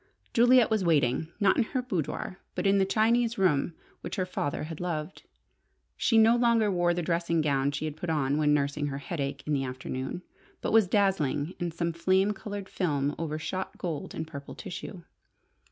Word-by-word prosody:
Juliet 245 0 +5
was 215 -3 +2
waiting, 155 -3 +2
not 200 -2 +4
in - - +4
her 255 +3 -2
boudoir, 185 - -3 0.2
but - - -2
in 200 0 +4
the 190 - +4
Chinese 230 +3 +2
room 165 -3 +2 0.2
which - - -5
her 185 - 0
father 145 -6 -3
had 155 0 -7
loved. 170 -1 -4 0.7
She 225 - +2
no 225 +1 +6
longer 235 -3 +3
wore 175 -1 +2
the 175 - -2
dressing 170 0 0
gown 140 -3 +1
she 145 +2 -3
had 155 -2 -4
put 165 +2 -5
on 145 -2 +1
when 150 -1 +3
nursing 145 0 +1
her 140 -1 -3
headache 140 -2 -4
in 150 - -1
the 135 -2 +1
afternoon, 130 +5 -5 0.4
but - - -2
was 220 -4 +6
dazzling 180 -6 +1
in 175 - -1
some 170 0 -2
flame 190 +4 +2
coloured 205 -1 -6
film 145 -7 -1
over 155 -2 -2
shot 185 +4 -4
gold 165 -5 -4
and - - -3
purple 140 -3 -9
tissue. 185 -2 -7
170 Hz, 185 wpm, -28 LUFS, 145-195 Hz, 0.7 s, no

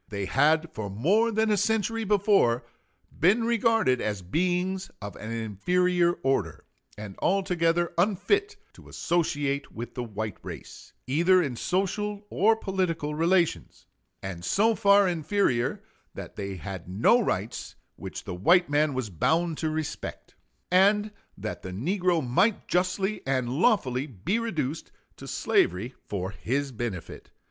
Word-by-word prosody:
They 100 -3 -3
had 160 - +2
for 105 -2 -5
more 190 - +2
than 220 0 +1
a 210 - +3
century 220 +2 0
before 195 - +3 0.5
been 200 +8 +4
regarded 225 - +2
as 105 -3 -3
beings 180 - -1
of 100 -1 -7
an 110 - -8
inferior 175 - +1
order, 120 - -1 0.3
and 105 -2 -8
altogether 175 -3 +1
unfit 390 - +1 0.2
to - - -16
associate 145 -5 -1
with 120 +1 -7
the 125 - -4
white 110 -3 -5
race, - - -10
either 175 +7 +3
in 135 -5 -3
social 200 - -2
or 220 +4 +4
political 185 -8 -2
relations; 170 +2 0 0.4
and 90 -3 -6
so 220 - +3
far 200 -1 +5
inferior, 175 - 0 0.3
that - - -8
they 100 -2 -5
had 90 +1 -7
no 115 - +4
rights 105 - -3 0.2
which - - -7
the - - -6
white 170 - +3
man 145 -1 +2
was 125 -6 -3
bound 160 - 0
to 160 - 0
respect; 155 -1 -5 0.4
and 205 +3 +4 0.3
that 105 +2 -5
the 95 - -7
negro 170 - 0
might 200 - +2
justly 185 +3 0
and 130 -3 0
lawfully 135 - +1
be 150 - -2
reduced 160 - -3 0.3
to - - -10
slavery 100 +9 +1
for 95 -2 -3
his 135 +6 -2
benefit. 110 -7 -6
165 Hz, 135 wpm, -27 LUFS, 120-195 Hz, 0.5 s, far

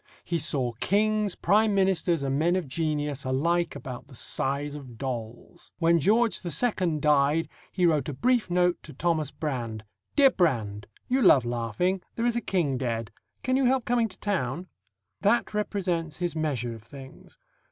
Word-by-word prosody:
He 170 -1 -1
saw 140 -5 0
kings, 210 0 +1
prime 210 +3 +3
ministers, 180 -5 +2
and 135 +1 0
men 170 +3 +2
of 185 -5 -2
genius 150 -1 -2
alike 170 +7 0
about 130 0 -8
the 135 - -13
size 140 +4 -1
of 130 -6 -9
dolls. 120 -3 -6
When 170 0 +3
George 215 +5 +3
II. 175 -1 +1
died, 150 +1 +3 0.2
he 180 -2 +1
wrote 150 -5 +2
a - - -3
brief 245 - +1
note 180 0 +2
to 150 - -11
Thomas 155 0 0
Brand: 120 -9 -4 0.3
"Dear 275 -2 +6
Brand 110 - 0 0.2
You 260 +2 +1
love 130 - +6
laughing; 120 - -1
there 230 - -1
is 240 -1 +2
a 235 - 0
king 160 - 0
dead; 115 -4 -2 0.3
can 255 - +1
you 265 0 +2
help 255 -1 +2
coming 240 -2 +2
to 185 - -15
town?" 175 -5 -2 0.6
That 235 +1 +2
represents 180 -6 -2
his 175 -2 -2
measure 135 -7 -1
of 115 - -10
things. 135 +3 -13
160 Hz, 165 wpm, -27 LUFS, 135-190 Hz, 0.6 s, Dear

